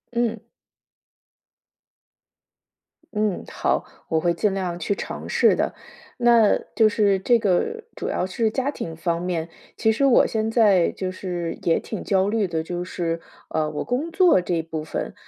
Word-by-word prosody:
嗯。 235 -1 0 2.7
嗯， 210 -3 0
好， - - -1 0.2
我 160 - +2
会 170 +2 +1
尽 195 +3 0
量 180 -3 -2
去 200 +5 -1
尝 - - -6
试 - - +4
的。 - - -1 0.4
那 235 -3 +5 0.2
就 220 -1 +5
是 205 -2 +2
这 235 +5 +3
个 225 - 0
主 - - -4
要 - - -1
是 220 +4 0
家 265 +5 -1
庭 165 - -6
方 170 +1 -1
面， 170 -2 -2 0.3
其 220 -1 +3
实 235 +6 -1
我 265 -3 +6
现 220 0 -1
在 205 -7 +4
就 185 -1 -4
是 175 -3 -4
也 165 - +2
挺 215 - -6
焦 190 -1 +2
虑 210 -2 +1
的， 160 -2 -2
就 175 +1 -4
是， 170 -2 -3 0.3
呃， 155 -1 0
我 150 - -3
工 275 +7 -2
作 350 - +5
这 170 -2 -1
部 160 -1 -5
分。 155 - -4
190 Hz, 175 characters per minute, -23 LUFS, 170-225 Hz, 2.7 s, 我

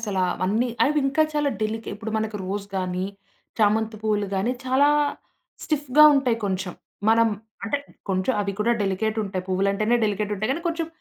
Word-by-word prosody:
అసలా 195 -4 0 0.2
అన్నీ. 220 +6 +1 0.2
అవి 300 +1 +2
ఇంకా 310 +3 +3
చాలా 295 -1 +1
డెలికె 225 +1 -3
ఇప్పుడు 215 +1 -6
మనకు 220 -1 -2
రోజ్ 200 +1 -3
గాని, 185 0 -2 0.5
చామంతి 215 +1 +2
పూలు 210 -1 0
గాని, 210 +6 0
చాలా 265 +3 +4 0.8
స్టిఫ్‌గా 295 -1 +4
ఉంటాయి 255 -4 +2
కొంచెం. 190 -2 -2 0.3
మనం 225 0 +5 0.4
అంటే, 280 +8 0 0.3
కొంచెం 190 +6 +1
అవి 200 -1 -1
కూడా 235 +3 +3
డెలికేటుంటాయి. 200 -1 -1
పువ్వులంటేనే 200 +5 +2
డెలికేటుంటాయి. 210 +1 -1
కానీ, 335 +4 -4
కొంచెం 330 -1 -2
215 Hz, 145 wpm, -24 LUFS, 195-250 Hz, 0.8 s, మనం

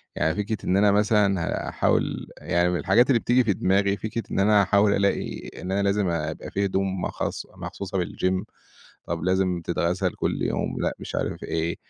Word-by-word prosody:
يعني 80 +1 +1
فكرة 105 +1 -2
إن 95 - +2
أنا 100 0 +5
مثلًا 105 -3 +3 0.3
هاحاول - - 0
يعني 85 +1 +1
من 90 - 0
الحاجات 120 +3 +4
اللي 120 -3 +4
بتيجي 125 +2 +3
في 105 -3 +2
دماغي 100 +2 +1
فكرة 110 +1 -4
إن - - 0
أنا 105 +1 +5
هاحاول 100 +1 +3
ألاقي 100 0 -1
إن 95 - -4
أنا 100 +1 +1
لازم 100 -2 +1
أ 80 -2 -1
أبقى - - -9
في 100 0 0
هدوم 95 -1 -1
مخص - - -3
مخصوصة 95 -1 -4
بالgym 95 0 -1 0.6
طَب 85 0 -3
لازم 95 -1 +1
تتغسل 90 +2 0
كلّ - - -2
يوم، - - -1
لأ، - - 0
مش - - -7
عارف - - -2
إيه. 80 +1 -2
95 Hz, 185 wpm, -25 LUFS, 90-105 Hz, 0.6 s, أنا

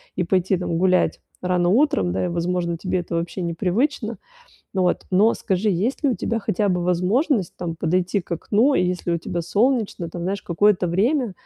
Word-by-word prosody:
и 180 - 0
пойти 185 +2 +1
там 170 -2 -2
гулять 185 +1 +2 0.2
рано 180 -1 +1
утром, 195 - +2
да, 95 - -1
и, - - 0
возможно, 170 0 -1
тебе 185 +1 -1
это 170 -1 -4
вообще 170 +3 -3
непривычно. 215 - -1 0.6
Вот, 185 -2 +1
но 205 +5 +4
скажи, 195 +3 0
есть 210 - -1
ли 280 - +4
у - - +1
тебя 230 +3 -2
хотя 205 -1 0
бы 180 -2 0
возможность 190 - +1
там 170 -2 -4
подойти 180 +4 0
к 175 - -19
окну, 220 - +2
и - - +3
если 180 -1 -1
у - - +2
тебя 170 +1 -4
солнечно 210 -2 0
там, 175 - -6
знаешь, 190 +2 -2
какое-то 185 +2 +2
время 225 - +1
185 Hz, 190 wpm, -22 LUFS, 175-210 Hz, 0.6 s, но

